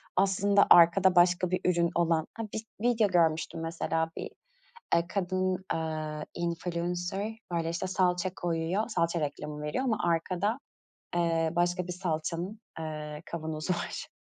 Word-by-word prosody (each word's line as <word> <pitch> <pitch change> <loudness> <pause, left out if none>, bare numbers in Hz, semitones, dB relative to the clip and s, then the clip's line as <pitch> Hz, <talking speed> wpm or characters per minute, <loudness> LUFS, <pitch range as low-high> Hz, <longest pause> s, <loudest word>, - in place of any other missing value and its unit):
aslında 200 +1 +4
arkada 175 +2 +7
başka 175 0 +4
bir 185 - +1
ürün 170 -1 +3
olan. 165 -2 +2
Ha, 225 - -5
bis 220 - -3 0.2
video 235 -2 +3
görmüştüm 165 -3 +1
mesela 165 0 -1
bir, - - -4 0.7
eee, 170 - +2
kadın, 185 -1 -1
eee, 155 -2 -3
influencer, 175 +4 -2 0.2
böyle, 165 -1 0
işte, 170 +3 -2
salça 185 -1 +1
koyuyor, 175 +4 -1
salça 170 -5 0
reklamı 150 0 -4
veriyor 150 +13 -2
ama 235 -5 +1
arkada, 180 +7 0 0.6
ııı, 165 -1 +1
başka 175 +1 +1
bir 180 - -3
salçanın, 175 +3 -3 0.2
ııı, 150 -1 -5
kavanozu 160 +1 -3
var. 175 - -4
175 Hz, 135 wpm, -29 LUFS, 165-185 Hz, 0.7 s, arkada